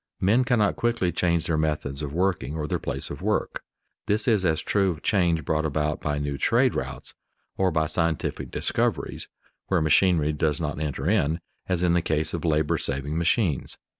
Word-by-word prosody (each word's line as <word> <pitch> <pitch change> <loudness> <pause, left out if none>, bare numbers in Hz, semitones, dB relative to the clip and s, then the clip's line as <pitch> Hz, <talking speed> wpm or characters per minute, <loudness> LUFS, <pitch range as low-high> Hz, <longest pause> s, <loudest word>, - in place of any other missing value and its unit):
Men 110 +7 +3
cannot 115 -4 +2
quickly 115 -7 +1
change 85 -1 +1
their 80 -2 0
methods 75 -2 -1
of 75 -2 -4
working 85 -2 -1
or 75 -2 -3
their - - -1
place - - -4
of - - -7
work. - - -1 0.5
This 105 +4 +1
is 110 -5 +3
as 80 -3 +2
true 100 -2 +1
of 80 -4 -5
change 85 -7 +2
brought 80 0 0
about 75 0 -1
by 75 -1 -1
new 70 -1 -3
trade - - +3
routes - - -5 0.4
or 95 -1 +2
by 80 -2 +1
scientific 80 -1 -1
discoveries - - -1 0.4
(where 95 - +2
machinery 80 0 +3
does 75 -1 0
not 75 -3 -3
enter 75 -1 -3
in) 85 -6 +2 0.3
as 90 -1 0
in 85 -1 +3
the 85 - +3
case 80 -1 0
of 85 - -3
labor 75 -2 +1
saving 70 +2 -3
machines. 85 - 0
80 Hz, 185 wpm, -25 LUFS, 75-90 Hz, 0.5 s, Men